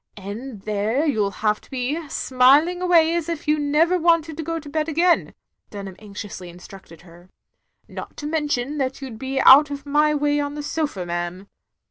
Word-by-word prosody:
And 210 +3 -8
there 215 +7 0
you 220 -9 +1
'U - - -1
have 210 +1 -1
to - - -21
be, 280 +5 -3
smiling 280 +10 +3
away 335 -3 +4
as 340 -1 -2
if 335 -1 -5
you 300 0 +2
never 310 +5 +2
wanted 330 -2 +2
to - - -3
go 330 +1 -3
to 300 - -13
bed 305 +2 -2
again," 340 +2 +2 0.3
Dunham 195 -2 -8
anxioxisly 200 -3 -8
instructed 175 -1 -13
her. 175 +1 -17 0.3
" - - -52 0.2
Not - - -9
to 295 - -7
mention 295 -2 -2
that 265 0 -2
you 265 - -6
'd 220 - -10
be 265 +1 -3
out 290 +2 +8
of 285 0 -7
my 300 +1 +2
way 290 0 +1
on 285 0 -3
the 295 - -5
sofa, 290 - -3
ma'am." 175 +2 -4
285 Hz, 195 wpm, -22 LUFS, 210-310 Hz, 0.3 s, out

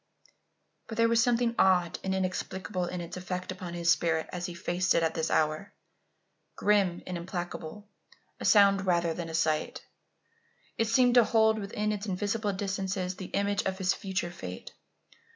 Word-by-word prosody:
But 225 - -7
there 230 0 +4
was 230 0 +3
something 235 0 +2
odd 180 -2 +3
and 190 0 -1
inexplicable 185 0 -2
in 175 0 -4
its 170 +1 -7
effect 180 0 -4
upon 180 -2 -7
his 170 -1 +2
spirit 160 -1 +1
as 175 -1 -3
he 175 - -7
faced 180 +1 0
it 165 - +3
at 160 0 +1
this 160 0 -1
hour. 155 +6 0 0.8
Grim 200 -4 +2
and 180 -1 -4
implacable 175 +2 -6 0.5
a - - -5
sound 200 -2 +5
rather 170 -2 +2
than 170 0 -5
a 160 - -4
sight 155 -1 -1 0.9
it 225 - 0
seemed 245 +2 +4
to 245 -1 +7
hold 220 0 +3
within 210 +1 -2
its 210 0 -4
invisible 205 +2 -1
distances 190 -1 -3
the 190 - -7
image 200 +1 0
of 190 0 -2
his 185 -1 +1
future 190 -4 -3
fate. 90 - -8
190 Hz, 170 wpm, -29 LUFS, 175-205 Hz, 0.9 s, to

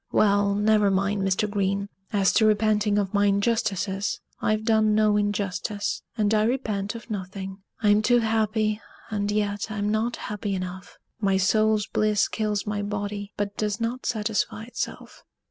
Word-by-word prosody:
Well, 200 -1 +3
never 210 0 +3
mind 195 +1 +1
Mr. 195 +2 +1
Green; 200 -1 -1 0.2
as 200 -3 +3
to 220 - +4
repenting 210 -1 +2
of 200 -1 0
my 205 0 +3
injustices, 200 -1 0 0.2
I've 215 0 +1
done 220 -2 +3
no 215 -1 +4
injustice, 205 0 -1 0.2
and 210 -1 +2
I 215 0 +3
repent 215 -4 -1
of 230 0 -9
nothing. 190 -1 -5 0.2
I'm 210 0 +5
too 240 +3 +4
happy, 220 -1 +1 0.3
and 205 -1 -1
yet 205 0 -1
I'm 210 -1 -1
not 220 +3 0
happy 205 -1 -4
enough. 185 +1 -6 0.2
My 195 -3 +2
soul's 215 +2 +3
bliss 215 -1 +1
kills 210 -2 -1
my 205 -1 -2
body, 205 0 -4
but 205 0 -2
does 210 0 -1
not 235 +2 -2
satisfy 215 -1 -1
itself." 235 +1 -6
210 Hz, 155 wpm, -25 LUFS, 200-215 Hz, 0.3 s, I'm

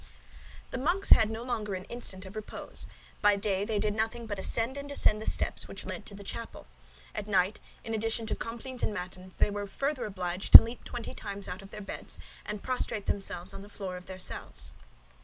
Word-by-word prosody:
The 255 - -2
monks 350 +8 0
had 220 -1 +8
no 225 +1 -4
longer 215 -5 -2
an 185 - -5
instant 195 -3 -5
of 190 +3 -10
repose. 215 -1 -5 0.3
By 205 -1 +6
day 200 -1 0
they 215 -1 0
did 210 0 +1
nothing 225 +2 -1
but 205 -3 -4
ascend 230 +6 0
and 280 0 -6
descend 215 -6 +3
the - - -5
steps - - -1
which - - -8
led - - -6
to 200 - -8
the 200 - -9
chapel; 230 +3 -7 0.5
at 205 - -4
night, 195 0 +2 0.2
in 225 - -4
addition 225 +1 0
to 220 - -1
complines 240 +2 -6
and 210 - 0
matins, 185 0 -7
they - - +3
were 205 0 -3
further 275 +6 -1
obliged 185 -2 -3
to - - +17
leap 230 +2 -7
twenty 240 -2 -6
times 200 0 -5
out 180 +2 -5
of 195 - -12
their 210 - -8
beds 200 - -6 0.3
and 210 -1 -4
prostrate 250 -5 -1
themselves 180 -3 -2
on - - -7
the 200 - -11
floor 195 -3 -5
of 180 0 -9
their 185 0 -6
cells. 65 - -4
210 Hz, 215 wpm, -30 LUFS, 195-230 Hz, 0.5 s, to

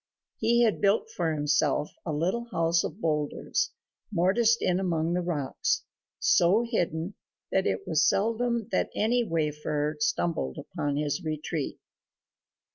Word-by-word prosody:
He 235 +2 +3
had 220 -3 +1
built 205 +2 +2
for 175 -8 -1
himself 150 -1 +1 0.2
a - - 0
little 180 +10 0
house 165 -4 +2
of 165 - -5
boulders 150 -5 -1 0.4
mortised 215 +6 +3
in 180 0 +1
among 170 -3 0
the 180 - +1
rocks, 155 -6 -1 0.3
so 185 +7 +4
hidden 175 -5 -1 0.4
that 190 - +2
it - - -2
was 160 -1 +3
seldom 230 +2 0
that - - +1
any 240 +3 +2
wayfarer 150 -4 -1
stumbled 175 - 0
upon 145 -1 -3
his 150 +4 -1
retreat. 155 -1 -3
170 Hz, 130 wpm, -28 LUFS, 155-220 Hz, 0.4 s, so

